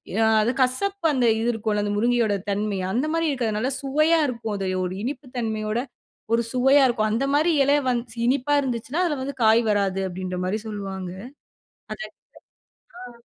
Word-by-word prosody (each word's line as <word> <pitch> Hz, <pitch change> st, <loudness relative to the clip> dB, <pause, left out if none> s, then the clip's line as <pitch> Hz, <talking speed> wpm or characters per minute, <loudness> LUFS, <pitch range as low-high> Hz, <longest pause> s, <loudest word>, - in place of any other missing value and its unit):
ம் 225 Hz, +1 st, +3 dB
அது 215 Hz, +3 st, +2 dB
கசப்பு 390 Hz, +9 st, 0 dB
அந்த 255 Hz, -4 st, +1 dB
இது 225 Hz, -, -1 dB
இருக்கும்ல, 215 Hz, -2 st, -1 dB
அந்த 205 Hz, -, -1 dB
முருங்கையோட 235 Hz, -1 st, +2 dB, 0.2 s
தன்மை. 205 Hz, 0 st, -1 dB
அந்த 250 Hz, +8 st, 0 dB
மாரி 330 Hz, 0 st, +1 dB
இருக்காது. 250 Hz, -6 st, -1 dB
அதுநல்ல 220 Hz, +6 st, -1 dB
சுவையா 310 Hz, +4 st, +3 dB
இருக்கும். 230 Hz, -4 st, -4 dB
அது 195 Hz, -, -3 dB, 0.2 s
ஒரு 180 Hz, -, -4 dB
இனிப்பு 270 Hz, +2 st, -5 dB
தன்மையோட 220 Hz, -2 st, -2 dB, 0.6 s
ஒரு 230 Hz, -, +3 dB
சுவையா 270 Hz, +3 st, +5 dB
இருக்கும். 220 Hz, -3 st, 0 dB
அந்த 235 Hz, +5 st, 0 dB
மாரி 315 Hz, +4 st, +3 dB
எலை 285 Hz, +1 st, +4 dB
வந்துச்சு 240 Hz, -1 st, -3 dB
இனிப்பா 270 Hz, +2 st, +1 dB
இருந்துச்சுனா 255 Hz, +4 st, -2 dB
அதி்ல 305 Hz, -6 st, -1 dB
வந்து 280 Hz, +1 st, -5 dB
காய் 220 Hz, +1 st, +5 dB
வராது. 195 Hz, -2 st, 0 dB
அப்பிடீன்ற 180 Hz, 0 st, -5 dB
மாரி 200 Hz, +4 st, -1 dB
சொல்லுவாங்க. 195 Hz, -3 st, -5 dB, 0.8 s
அது -, -, -5 dB
எனக்கு -, -, -24 dB, 0.9 s
ஆ. -, -, -13 dB
235 Hz, 170 wpm, -24 LUFS, 210-270 Hz, 0.9 s, சுவையா